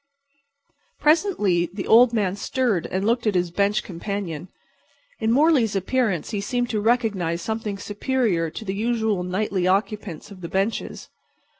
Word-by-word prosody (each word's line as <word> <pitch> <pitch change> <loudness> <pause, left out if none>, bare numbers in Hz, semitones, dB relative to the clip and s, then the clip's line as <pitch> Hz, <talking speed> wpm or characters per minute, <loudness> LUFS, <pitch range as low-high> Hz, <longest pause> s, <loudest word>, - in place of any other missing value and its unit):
Presently 255 - +2
the 190 +1 -5
old 235 +2 +6
man 200 -5 0
stirred 210 -3 -1
and 190 +2 -2
looked 235 +1 +1
at 210 - +1
his 175 -1 +1
bench 200 +3 +1
companion. 180 -2 -5 0.7
In 220 0 +1
Morley's 270 -6 +3
appearance 195 -2 0
he 205 - -2
seemed 245 +3 -1
to 215 -2 0
recognize 205 -8 0
something 220 -2 -3
superior 205 -4 -1
to 220 - -8
the 190 - -2
usual 220 -2 0
nightly 185 0 -1
occupants 200 -2 -1
of 190 -2 -11
the 170 - -6
benches. 195 +5 -2
205 Hz, 145 wpm, -23 LUFS, 185-230 Hz, 0.7 s, old